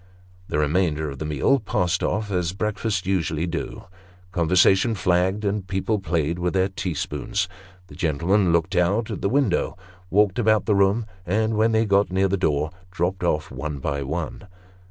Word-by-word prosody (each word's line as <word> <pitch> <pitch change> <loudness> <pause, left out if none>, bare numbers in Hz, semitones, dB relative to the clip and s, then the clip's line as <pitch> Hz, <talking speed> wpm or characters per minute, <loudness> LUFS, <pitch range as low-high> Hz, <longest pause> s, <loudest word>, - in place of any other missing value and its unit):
The - - -2
remainder 75 -1 +1
of 70 - -9
the 80 - -3
meal 75 - +2
passed 90 -5 0
off 105 -1 -1
as 90 -2 0
breakfasts 105 -1 -2
usually 85 -4 0
do. 85 -1 -5 0.5
Conversation 95 +5 +3
flagged, 95 +2 +1
and 100 -1 -1
people 100 +2 -1
played 85 -2 -1
with 90 +1 -1
their 95 +1 +2
tea 95 -3 -4
spoons. 100 +8 -2 0.4
The - - -15
gentlemen 85 +5 +1
looked 85 +3 +1
out 100 +6 +1
at 105 - -5
the 100 - +1
window; 125 -10 +1 0.3
walked 100 +2 +3
about 110 -2 +3
the 105 - +2
room; 100 +3 +3 0.2
and, 110 +5 0
when 110 +1 +3
they 110 0 +2
got 100 -2 +2
near 95 +1 +2
the 95 - 0
door, 75 -4 0 0.2
dropped 90 +1 -2
off 75 -3 0
one 75 -2 -4
by 70 +1 -2
one. 80 +7 -4
95 Hz, 175 wpm, -23 LUFS, 85-105 Hz, 0.5 s, Conversation